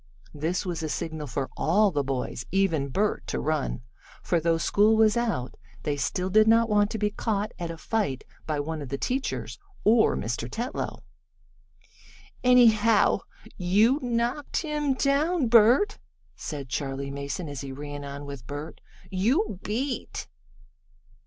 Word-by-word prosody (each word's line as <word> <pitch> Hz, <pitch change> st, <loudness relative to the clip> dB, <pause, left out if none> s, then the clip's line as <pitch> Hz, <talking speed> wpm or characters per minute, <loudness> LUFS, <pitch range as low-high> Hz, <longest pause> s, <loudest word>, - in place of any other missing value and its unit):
This 160 Hz, +6 st, -2 dB
was 175 Hz, -3 st, -3 dB
a 155 Hz, -, -3 dB
signal 155 Hz, -1 st, -4 dB
for 130 Hz, +2 st, -2 dB
all 200 Hz, +5 st, +3 dB
the 145 Hz, -3 st, 0 dB
boys, 135 Hz, -2 st, -3 dB
even 180 Hz, -7 st, +1 dB
Bert, 205 Hz, +10 st, 0 dB
to -, -, -2 dB
run, 150 Hz, -5 st, -1 dB, 0.4 s
for, 175 Hz, -, +1 dB
though 165 Hz, 0 st, +2 dB
school 210 Hz, +6 st, +3 dB
was 220 Hz, -1 st, +5 dB
out, 220 Hz, -, -1 dB, 0.3 s
they 145 Hz, -, 0 dB
still 180 Hz, +6 st, -2 dB
did 215 Hz, +2 st, +5 dB
not 230 Hz, +1 st, +5 dB
want 205 Hz, -1 st, +3 dB
to 220 Hz, -, -3 dB
be 210 Hz, 0 st, 0 dB
caught 210 Hz, -1 st, -2 dB
at 170 Hz, -1 st, -3 dB
a 165 Hz, -, -6 dB
fight 180 Hz, -, -1 dB, 0.2 s
by 155 Hz, -2 st, -1 dB
one 155 Hz, +1 st, -3 dB
of 140 Hz, -, -7 dB
the 140 Hz, -, -2 dB
teachers, 130 Hz, -, -3 dB, 0.2 s
or 220 Hz, +1 st, +4 dB
Mr. 115 Hz, +2 st, -3 dB
Tetlow. 240 Hz, -, -4 dB, 1.4 s
"Anyhow, 230 Hz, -3 st, +5 dB, 0.4 s
you 210 Hz, +9 st, +3 dB
knocked 245 Hz, +6 st, -1 dB
him 300 Hz, -3 st, 0 dB
down, 290 Hz, +4 st, +2 dB
Bert," 240 Hz, -, +5 dB, 0.4 s
said 145 Hz, -4 st, -6 dB
Charley 140 Hz, +1 st, -3 dB
Mason, 140 Hz, +4 st, -4 dB
as 145 Hz, -2 st, -6 dB
he 135 Hz, -1 st, -6 dB
ran 145 Hz, +1 st, -7 dB
on 140 Hz, 0 st, -7 dB
with 140 Hz, -4 st, -8 dB
Bert. 145 Hz, +3 st, -7 dB, 0.3 s
"You 220 Hz, -, +1 dB
beat!" 250 Hz, +6 st, -3 dB
185 Hz, 150 wpm, -27 LUFS, 145-230 Hz, 1.4 s, was